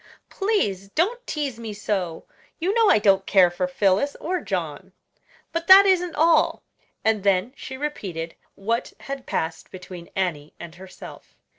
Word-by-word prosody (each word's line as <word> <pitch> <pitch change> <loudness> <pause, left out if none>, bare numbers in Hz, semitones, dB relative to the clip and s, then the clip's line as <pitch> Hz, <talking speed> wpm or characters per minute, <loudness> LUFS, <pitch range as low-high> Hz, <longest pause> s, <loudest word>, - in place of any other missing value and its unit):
"Please 205 - -1
don't 455 - -1
tease 280 -6 -3
me 225 -2 -6
so. 195 -5 -3 0.3
You 360 +4 0
know 455 -2 +4
I - - +6
don't 195 -2 +3
care 185 -3 +5
for 225 +10 -2
Phillis 270 +1 +1
or 360 +1 -2
John; 180 - -4 0.6
but 335 0 -3
that 390 +1 +10
isn't 360 -3 +2
all." 320 +1 +3 0.4
And 220 -3 +2
then 200 +4 +1
she 265 -1 -8
repeated 185 - -5 0.2
what 230 +4 -2
had 275 -1 -7
passed 160 0 -3
between 180 -2 -10
Annie 160 -6 -2
and 170 -2 -9
herself. 185 +1 -12
210 Hz, 150 wpm, -23 LUFS, -, 0.6 s, that